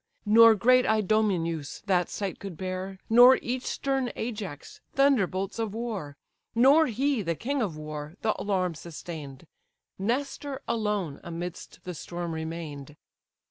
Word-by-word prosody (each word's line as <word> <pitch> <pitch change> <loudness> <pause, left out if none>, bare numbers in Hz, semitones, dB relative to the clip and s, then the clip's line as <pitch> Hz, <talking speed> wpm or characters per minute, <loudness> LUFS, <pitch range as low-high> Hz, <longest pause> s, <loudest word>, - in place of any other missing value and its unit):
Nor 225 +1 +8
great 255 +5 +5
Idomeneus 190 - 0
that 180 -3 +2
sight 200 -3 -4
could 195 -5 -7
bear, 185 +1 -4
Nor 245 +3 +8
each 250 +1 -3
stern 270 -2 -1
Ajax, 205 - -6
thunderbolts 205 -8 +2
of 220 -2 -2
war: 210 -12 -4 0.4
Nor 280 +7 +6
he, 265 +2 0
the 170 -3 -1
king 275 - -2
of 180 -9 -2
war, 150 +1 -7
the 215 -1 +2
alarm 185 -4 0
sustain'd 155 -3 -8 0.5
Nestor 270 +5 -2
alone, 210 -9 -1
amidst 175 +1 -7
the 180 - -5
storm 175 +2 -5
remain'd. 160 -3 -6
195 Hz, 130 wpm, -27 LUFS, 170-235 Hz, 0.5 s, Nor